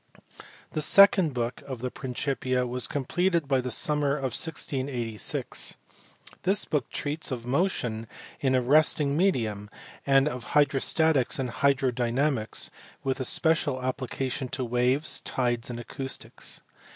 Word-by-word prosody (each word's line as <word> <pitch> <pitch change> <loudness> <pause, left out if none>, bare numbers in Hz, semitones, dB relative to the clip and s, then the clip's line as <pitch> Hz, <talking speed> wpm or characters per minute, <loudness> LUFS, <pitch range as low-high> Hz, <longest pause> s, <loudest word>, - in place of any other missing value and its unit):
The 155 - -1
second 195 0 +6
book 120 -1 -3
of 130 -2 -4
the 125 +2 -4
Principia 130 -1 -1
was 125 +1 -1
completed 170 +3 0
by 135 -2 +2
the 125 - -4
summer 145 +3 +1
of 135 -4 -3
1686. 130 -8 -2 0.6
This 195 +2 +2
book 145 -5 -1
treats 150 +2 -3
of 120 -3 -4
motion 125 - -1 0.3
in 130 -2 +2
a 130 - +2
resisting 145 +1 +3
medium, 110 - 0 0.3
and 135 0 +4
of 125 -5 -3
hydrostatics 145 0 +3
and 130 -3 -2
hydrodynamics, 130 -2 0 0.3
with 135 -1 -1
special 155 -5 +1
applications 130 0 -3
to 130 - -1
waves, 125 +5 +1
tides, 120 -1 -1
and 120 -1 -5
acoustics. 135 +3 -4
135 Hz, 125 wpm, -27 LUFS, 125-150 Hz, 0.6 s, second